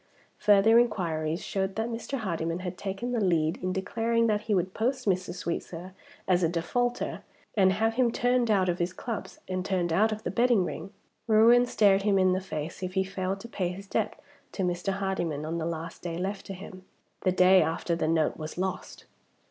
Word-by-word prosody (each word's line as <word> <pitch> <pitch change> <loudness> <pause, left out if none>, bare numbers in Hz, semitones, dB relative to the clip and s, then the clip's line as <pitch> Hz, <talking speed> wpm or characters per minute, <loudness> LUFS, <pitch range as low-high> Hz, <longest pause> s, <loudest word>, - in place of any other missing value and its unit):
Further 210 +3 +6
inquiries 170 -8 0
showed 190 -1 -2
that 220 +1 -1
Mr. 235 +4 -4
Hardyman 170 -5 -2
had 180 -1 -4
taken 195 +6 -4
the 235 -4 0
lead 165 -3 +1
in 185 0 -1
declaring 230 +5 0
that 210 -2 +1
he 215 -1 0
would 185 0 0
post 250 +4 -1
Mr. 185 -2 0
Sweetsir 175 0 -5 0.3
as 180 -1 +3
a 165 - +3
defaulter, 240 +9 -1 0.3
and 190 -3 +5
have 225 +3 +1
him 245 0 +2
turned 245 0 +1
out 195 -3 +3
of 175 0 0
his 175 +1 -1
clubs, 225 +3 -6
and 185 -1 -2
turned 180 -3 0
out 215 +6 +3
of 215 0 -4
the - - -2
betting 235 -6 +3
ring. 180 +3 -6 0.4
Ruin 235 +3 +6
stared 200 -4 +4
him 200 -1 +2
in 185 -1 +4
the 185 - -1
face 160 -3 -5
if 185 0 -4
he 190 - +3
failed 190 0 -3
to 235 - -8
pay 190 -6 -2
his 190 +2 -7
debt - - -2 0.3
to 195 - -2
Mr. 180 +2 -1
Hardyman 180 -6 -2
on 165 +2 -3
the 160 - -2
last 165 0 -5
day 170 -1 -4
left 195 +3 -4
to 195 - -5
him 185 0 -10 0.4
the 185 - +2
day 185 +1 +6
after 165 +2 -1
the 160 - -1
note 160 -1 +1
was 155 +1 -7
lost. 190 +1 -4
190 Hz, 205 wpm, -28 LUFS, 175-215 Hz, 0.4 s, Further